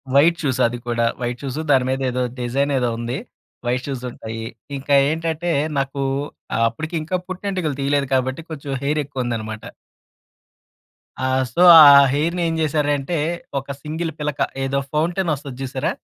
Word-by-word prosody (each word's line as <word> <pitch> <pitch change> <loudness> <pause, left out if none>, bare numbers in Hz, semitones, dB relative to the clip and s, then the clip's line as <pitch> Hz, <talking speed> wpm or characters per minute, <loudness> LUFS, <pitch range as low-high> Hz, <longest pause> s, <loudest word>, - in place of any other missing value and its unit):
White 165 +4 +5
shoes 130 -3 0
అది 120 +1 -4
కూడా 115 0 +1 0.2
white 120 +1 -3
shows 140 +2 -4
దాని 130 -2 +4
మీద 135 +1 -2
ఏదో 125 0 -1 0.2
డిజైన్ 135 +4 0
ఏదో 120 -1 +1
ఉంది. 120 +3 -3 0.5
వైట్ 125 +1 0
షూస్ 130 -3 -4
ఉంటాయి. 110 0 -7 0.3
ఇంకా 140 +1 +1
ఏంటంటే 165 +1 -1 0.3
నాకు 140 0 -1 0.7
అప్పటికి 155 +8 -6
ఇంకా 170 +4 -3
పుట్టింటికలు 185 -6 -3
తీయలేదు 140 0 +1
కాబట్టి, 130 +4 -1
కొంచెం 140 -2 -5
హెయిర్ 150 +2 +1
ఎక్కువ 135 -3 -4
ఉందన్నమాట. 110 -2 -4 1.6
ఆ! - - +1 0.3
సో 175 - +3 0.2
ఆ - - +12 0.3
హెయిర్‌ని 170 +5 0
ఏం 165 - -1
చేశారంటే 145 0 0 0.4
ఒక 135 - -8
సింగిల్ 160 +2 -3
పిలక 150 -2 -3 0.2
ఏదో 135 +1 0
ఫౌంటైన్ 170 +3 0
వస్తది 135 -2 -8
చూసారా? 130 0 -2
140 Hz, 150 wpm, -21 LUFS, 125-155 Hz, 1.6 s, ఆ